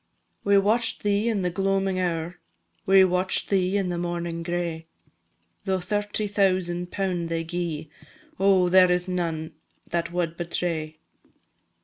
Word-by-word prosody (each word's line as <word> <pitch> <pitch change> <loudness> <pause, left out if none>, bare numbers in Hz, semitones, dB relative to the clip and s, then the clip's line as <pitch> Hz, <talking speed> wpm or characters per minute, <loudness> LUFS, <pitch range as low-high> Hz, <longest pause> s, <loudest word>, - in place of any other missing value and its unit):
We 200 0 +4
watch'd 220 +4 +2
thee 205 +2 +1
in 205 -4 0
the 180 - 0
gloamin' 195 0 0
hour, 175 -1 -2 0.5
We 190 0 +7
watch'd 185 +2 +1
thee 190 0 +2
in 195 -2 -1
the 175 -1 -2
mornin' 170 -1 -3
gray; 170 -1 -3 0.8
Though 190 -1 0
thirty 205 +3 -2
thousand 185 -3 0
pound 180 -4 -2
they 165 0 -1
gi'e, 165 -2 -4 0.5
Oh, 190 -2 +4
there 185 0 +6
is 180 +1 0
none 165 -3 -2 0.4
that 170 0 -1
wad 170 -2 -2
betray! 165 -2 -2
180 Hz, 135 wpm, -25 LUFS, 170-195 Hz, 0.8 s, We